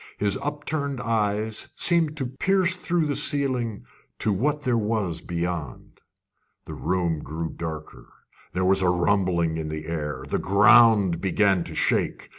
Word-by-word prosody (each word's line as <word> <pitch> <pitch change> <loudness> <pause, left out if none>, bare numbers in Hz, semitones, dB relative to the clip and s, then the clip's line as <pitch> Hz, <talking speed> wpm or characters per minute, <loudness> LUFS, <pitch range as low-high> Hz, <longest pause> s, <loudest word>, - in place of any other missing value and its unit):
His 100 -1 0
upturned 145 -1 -3
eyes 110 -1 -1
seemed 165 -3 +2
to 135 - -2
pierce 185 +8 +1
through 175 -2 -1
the 145 -2 -1
ceiling 130 -7 -1 0.3
to 105 - 0
what 145 +9 0
there 125 -4 0
was 105 -7 -1
beyond. 85 -6 -5 0.6
The - - -8
room 85 -4 -1
grew 80 +2 -5
darker. 80 -2 -8 0.4
There 95 0 0
was 95 +1 +4
a 90 - +3
rumbling 90 -2 +1
in 80 -1 -4
the 75 0 -5
air. 75 -5 -4
The - - -1
ground 100 -2 +5
began 95 -1 +2
to - - -8
shake. - - 0
100 Hz, 145 wpm, -24 LUFS, 85-130 Hz, 0.6 s, ground